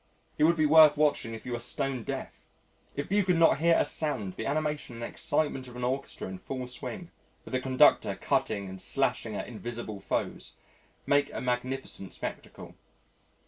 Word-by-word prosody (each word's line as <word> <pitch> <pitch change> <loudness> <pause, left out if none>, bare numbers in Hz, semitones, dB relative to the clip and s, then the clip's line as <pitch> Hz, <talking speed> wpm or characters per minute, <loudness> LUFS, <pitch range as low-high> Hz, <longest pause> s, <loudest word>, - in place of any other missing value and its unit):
He - - -6
would 170 +2 +5
be 155 - +3
worth 155 -1 +8
watching 145 -6 +1
if 110 - -11
you 125 - -5
were 120 - -2
stone 130 +2 -2
deaf. - - -6 0.5
If 145 +5 -4
you 205 0 +4
could 180 -2 +2
not 165 -4 +5
hear 165 +1 +5
a - - +3
sound, 110 - -2
the 110 - -4
animation 150 -3 -2
and 115 - -6
excitement 135 +1 -1
of 125 - -11
an 125 - -5
orchestra 130 +3 -2
in 95 0 -7
full 130 +5 -5
swing, 175 +8 -7 0.3
with - - -10
the 130 - +1
conductor 130 0 +4
cutting 100 -2 0
and 95 0 -7
slashing 125 -5 -1
at 95 - -4
invisible 115 -2 -6
foes, 95 - -3 0.5
make 145 0 +3
a - - -4
magnificent 125 -5 -3
spectacle. - - -7
130 Hz, 180 wpm, -29 LUFS, 115-150 Hz, 0.5 s, worth